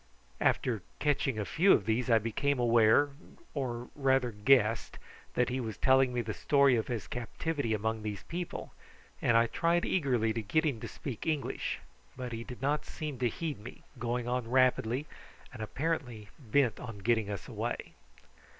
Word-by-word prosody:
After 115 -5 +1 0.2
catching 140 -4 +1
a 105 - -1
few 190 - +4
of 100 - +2
these 115 +4 0
I 115 - +6
became 120 +6 0
aware, 120 +3 +5 0.4
or 125 -4 -3
rather 135 -3 +2
guessed, 110 0 +3 0.4
that 125 0 +2
he 130 +1 -1
was 110 -5 -4
telling 130 -1 +4
me 125 -1 0
the 110 -2 -4
story 140 0 +4
of 110 - -1
his 115 -8 -3
captivity 120 - -3
among 110 +1 -2
these 105 -2 -5
people, 175 +1 -5 0.5
and 115 - +4
I 115 - +5
tried 170 +8 +1
eagerly 125 -10 +1
to 115 - -2
get 155 +11 +1
him 140 -7 0
to - - -6
speak 135 -1 -6
English; 155 -3 -1 0.4
but 125 -1 -5
he 115 0 -4
did 125 +1 -9
not 150 +2 +1
seem 150 -4 -5
to 125 -2 +2
heed 155 +3 -4
me, 115 +4 -11 0.2
going 120 0 -2
on 125 -1 -1
rapidly, 130 +1 +2 0.5
and 120 - -8
apparently 120 -4 -3
bent 125 -2 +1
on 115 -4 -7
getting 110 -3 +2
us 100 -2 -5
away. - - -4
125 Hz, 170 wpm, -31 LUFS, 115-140 Hz, 0.5 s, I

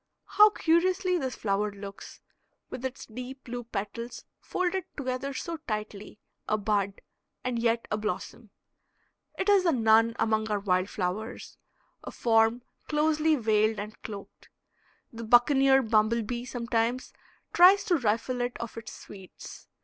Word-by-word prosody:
How 420 0 +6
curiously 365 +1 +1
this 260 -4 -3
flower 205 0 -1
looks, 200 0 -10 0.5
with 255 - -7
its 260 0 -5
deep 255 +4 -9
blue 245 0 -6
petals 230 +3 -6
folded 370 +1 -2
together 260 0 -3
so 330 +5 -5
tightly 210 -2 -5 0.3
a 215 - +2
bud 200 -2 -1 0.4
and 250 -2 -2
yet 230 0 0
a 210 - +1
blossom. 215 +1 -5 0.9
It 380 - -2
is 400 -2 +5
the 340 - +3
nun 225 -2 +4
among 220 0 0
our 210 -1 0
wild 185 -1 0
flowers, 200 +5 -5 0.4
a - - -6
form 225 +1 +2 0.2
closely 310 +1 +2
veiled 220 -3 +2
and 210 +2 -7
cloaked. 200 -2 -10 0.6
The 230 0 -7
buccaneer 265 +3 +5
bumble 220 +1 +2
bee 240 +2 -4
sometimes 240 0 -2 0.4
tries 370 +3 +7
to 370 -5 +2
rifle 240 +1 -1
it 245 0 -2
of 235 -1 -7
its 215 -1 -10
sweets. 190 -3 -12
235 Hz, 140 wpm, -28 LUFS, 215-270 Hz, 0.9 s, tries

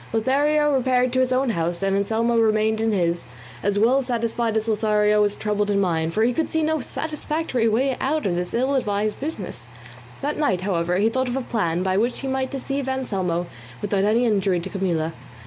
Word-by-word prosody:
Lothario 290 +6 +2
repaired 255 -1 +2
to 260 - +2
his 255 0 +2
own 255 -1 +2
house, 170 -1 -2
and 195 0 +1
Anselmo 225 +4 +1
remained 220 0 +2
in 225 0 +1
his, 170 -5 0 0.4
as 205 0 0
well 245 +6 +4
satisfied 235 -2 -1
as 220 +1 -1
Lothario 210 -1 +2
was 205 0 +2
troubled 210 -1 -1
in 200 -1 +2
mind; 165 -4 0
for 220 - +3
he 245 +2 +2
could 320 +5 -1
see 320 0 0
no 315 0 +1
satisfactory 300 -3 -2
way 255 +4 +1
out 300 +3 0
of 180 - +1
this 180 +3 -3
ill 260 +4 +1
advised 210 -5 -1
business. 205 - -6 0.5
That 295 +2 -2
night, 190 -12 +1
however, 180 -2 0
he 210 +3 +3
thought 260 +2 -1
of 245 +2 -2
a - - -1
plan 180 -8 -1
by 190 0 +1
which 235 +4 0
he 270 - -4
might 265 0 -1
deceive 275 0 -3
Anselmo 190 -10 -1 0.3
without 200 -1 0
any 225 +4 +3
injury 195 -5 +2
to 190 - -6
Camilla. 170 -5 -1
220 Hz, 200 wpm, -23 LUFS, 195-260 Hz, 0.5 s, well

